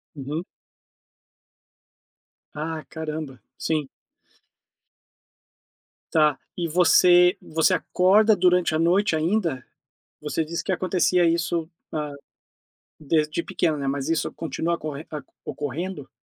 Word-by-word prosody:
Uhum. 145 +5 -4 2.1
Ah, 155 +1 -4
caramba! 155 -5 -6 0.2
Sim. 155 -4 -1 2.2
Tá. 150 -3 +3 0.2
E 170 -2 -1
você 180 +2 +5
você 160 +4 +1
acorda 200 +5 +4
durante 180 -3 +3
a 155 - +1
noite 175 +2 +3
ainda? 165 -5 0 0.6
Você 150 +2 -2
disse 165 +2 -4
que - - -4
acontecia 180 -1 +2
isso, 165 -1 0 0.2
ah, 150 -2 -3 0.9
desde 155 +2 0
pequena, 160 -3 0
né, 140 -1 -3
mas 135 0 -2
isso 165 - 0
continua 165 +1 -2
acorren 155 -2 -6
aco 150 -2 -8
ocorrendo? 150 +2 -5
160 Hz, 105 wpm, -24 LUFS, 150-180 Hz, 2.2 s, você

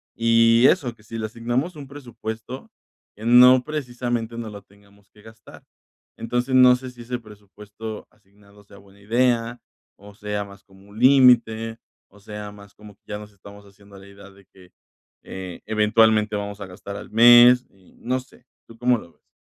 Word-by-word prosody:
y 115 +1 +4
eso, 130 -10 +1
que 105 - -24
si 115 +1 -9
le 110 - -4
asignamos 120 +9 -3
un 140 -2 -10
presupuesto 120 -2 -9 0.5
que 110 - -11
no 125 +2 +6
precisamente 120 -5 -4
nos 115 -2 -7
lo 100 -1 -10
tengamos 100 0 -26
que 105 - -21
gastar. 110 -1 -16 0.5
Entonces, 120 +3 -3
no 125 -1 +7
sé 130 0 -9
si 120 -1 -14
ese 125 +1 -5
presupuesto 105 0 -11
asignado 100 0 -24
sea 100 0 -18
buena 100 0 -21
idea 120 +2 0 0.4
o 105 +1 -15
sea 105 -1 -4
más 100 0 -16
como 95 +1 -21
un 105 +2 -12
límite, 120 -4 +4 0.3
o 105 - -20
sea 105 0 -9
más 100 -1 -16
como 105 -1 -15
que - - -55
ya 105 - -5
nos 105 0 -13
estamos 100 +1 -15
haciendo 100 0 -19
a - - -13
la 95 - -16
idea 100 0 -15
de 100 0 -21
que, 90 -1 -21 0.5
eh, 95 -2 -9
eventualmente 110 0 +2
vamos 100 0 -6
a 100 - -7
gastar 95 +2 -10
al - - -11
mes 120 +2 +7
y 95 -2 -25
no 130 +2 -2
sé, 125 -1 -19 0.2
¿tú 115 - -16
cómo 125 0 +1
lo 85 -5 -16
ves? - - -41
110 Hz, 185 wpm, -22 LUFS, 100-120 Hz, 0.5 s, no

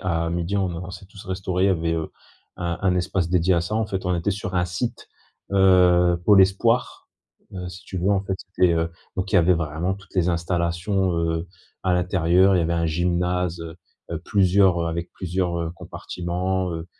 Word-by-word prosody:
à 85 -2 -1
12:00 85 +3 -2
on 95 -2 0
a 85 - -5
on 90 0 -7
s'est 95 +1 -10
tous 100 0 -13
restaurés, 95 0 -1
il - - +5
y 100 - +4
avait, 85 -2 0
heu, 80 -1 -3 0.5
un 85 -1 -3
un 95 -2 +2
espace 90 -1 -1
dédié 90 +1 +2
à 85 - +2
ça. 85 +5 -3
En 110 0 0
fait 95 -3 -4
on 90 - +1
était 85 +4 -1
sur 100 0 -4
un 90 -1 +2
site, 90 +7 -4 0.5
heu, 90 -2 +5
pour 105 - +6
l'espoir. 100 +6 +2 0.4
Heu, 90 -1 -6
si 90 0 -11
tu 95 - -5
veux, 90 - 0
en 100 -1 +2
fait, 95 -1 -2
c'était, 90 -1 +1
heu, 85 0 0 0.3
donc 95 0 -2
il - - 0
y - - +8
avait 90 +1 +4
vraiment 80 +3 -2
toutes 95 -1 -17
les 90 -2 +2
installations, 85 +2 0
heu, 80 0 -1 0.4
à 95 -1 +1
l'intérieur, 90 +1 +3
il - - +3
y 85 - +2
avait 85 - 0
un 85 0 +1
gymnase, 90 +1 0
heu 85 +1 -8 0.3
heu, 85 - -2
plusieurs, 95 -2 +3
heu - - -1
avec 85 +1 -4
plusieurs, 90 -1 -2
heu, 85 -1 -3
compartiments, 90 +2 -3
heu 80 0 -5
90 Hz, 215 wpm, -23 LUFS, 85-95 Hz, 0.5 s, y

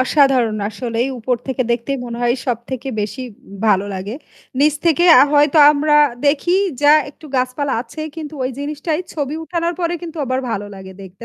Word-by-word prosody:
অসাধারণ। 260 -5 +3
আসলেই 230 +2 -2
উপর 245 +2 -1
থেকে 260 -1 -1
দেখতেই 245 +4 -2
মনে 235 0 -6
হয় 240 0 +2
সবথেকে 250 +2 -4
বেশি 210 +5 -4 0.4
ভালো 200 -2 +3
লাগে। 190 +4 -5 0.4
নিচ 295 +1 +3
থেকে 335 +1 +3 0.2
আ - - +8
হয়তো 295 +1 +4
আমরা 295 +1 +1 0.3
দেখি 305 +4 +2 0.3
যা 290 - +6 0.2
একটু 305 +2 -15
গাছপালা 255 +2 -1
আছে 310 - -10 0.2
কিন্তু 310 -1 -7
ওই 255 - -1
জিনিসটাই 300 +3 -3
ছবি 290 -1 -3
উঠানোর 340 +1 -2
পরে 345 0 0
কিন্তু 335 -1 -8
আবার 255 +1 -1
ভালো 205 -2 -3
লাগে 190 -1 -10
দেখতে। 190 +3 -12
265 Hz, 170 wpm, -18 LUFS, 235-300 Hz, 0.4 s, আ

